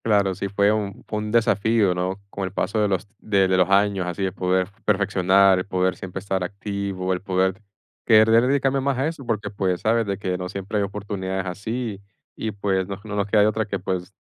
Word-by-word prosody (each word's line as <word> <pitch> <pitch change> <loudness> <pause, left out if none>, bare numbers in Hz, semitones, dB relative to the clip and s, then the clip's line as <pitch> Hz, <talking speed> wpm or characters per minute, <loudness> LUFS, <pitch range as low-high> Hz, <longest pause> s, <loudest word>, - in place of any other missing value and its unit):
Claro, 100 -3 +3
sí 100 +2 -4
fue 100 +1 +3
un 105 -3 -3
fue 105 - -2
un 105 0 -4
desafío, 110 -3 +3
¿no? 90 +2 -2
Con 100 - -3
el 95 - -5
paso 110 +3 -1
de 105 - +3
los 95 +1 -1
de 100 -3 +2
de 95 - +2
los 95 0 +3
años, 100 -2 +2
así 90 +2 -3
de 95 - 0
poder 90 0 0 0.2
perfeccionar, 95 -2 +4
el 90 - -3
poder 95 -1 0
siempre 95 +1 -6
estar 95 -1 -2
activo, 100 -1 -3
el 90 - -3
poder 95 +1 0 0.4
querer 110 0 +6
dedicarme 135 0 +1
más 135 -1 0
a 135 - 0
eso, 160 -4 -5
porque, 105 -3 -2
pues, 95 -3 -1
¿sabes? 115 0 +2
De 100 -1 -1
que 90 -2 -3
no 90 0 -4
siempre 100 +3 -3
hay - - +1
oportunidades 95 -2 -4
así, 105 +3 -4 0.3
y, 110 - -3
pues, 95 -2 -1
no 100 0 -6
no 105 -1 -6
nos 100 0 0
queda 105 0 +4
de 105 - +5
otra 110 0 0
que, 100 -1 -3
pues, 90 0 -4
100 Hz, 225 wpm, -23 LUFS, 95-105 Hz, 0.4 s, querer